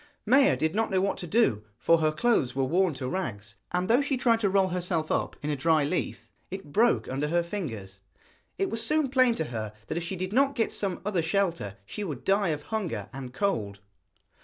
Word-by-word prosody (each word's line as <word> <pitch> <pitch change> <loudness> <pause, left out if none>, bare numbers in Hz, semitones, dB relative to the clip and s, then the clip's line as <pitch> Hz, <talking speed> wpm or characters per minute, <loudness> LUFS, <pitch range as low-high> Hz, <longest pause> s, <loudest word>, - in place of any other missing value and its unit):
Maia 270 +5 +5
did 160 +1 0
not 225 +1 +1
know 190 -2 +2
what 195 +1 0
to 175 - -5
do, 165 - +2
for 165 +6 +3
her 155 -1 +2
clothes 155 - +1
were 135 - +1
worn 170 +3 +2
to 130 - -4
rags, 105 - -4
and 180 +1 0
though 240 +6 +4
she 280 -1 0
tried 235 -3 +3
to 205 -3 +1
roll 190 -1 +3
herself 175 -3 -1
up - - 0
in 150 - -1
a - - 0
dry 155 +2 +3
leaf 155 +5 -2 0.2
it 190 -6 -7
broke 230 +8 +3
under 140 +3 -2
her 170 +2 +1
fingers. 115 - -6 0.6
It 390 -10 -1
soon 305 +8 +2
was 275 - -2
plain 255 -3 +4
to 160 - -1
her 110 -6 -5
that - - -4
if - - -6
she 175 +3 -4
did 185 +2 -4
not 275 +3 +3
get 225 -3 0
some 190 -4 -2
other 200 -4 +1
shelter 165 - -1
she 210 - -5
would 145 -9 -5
die 195 +1 +2
of 150 -2 -2
hunger 175 - -3
and 130 -1 -7
cold. 110 - -1
175 Hz, 220 wpm, -28 LUFS, 140-210 Hz, 0.6 s, Maia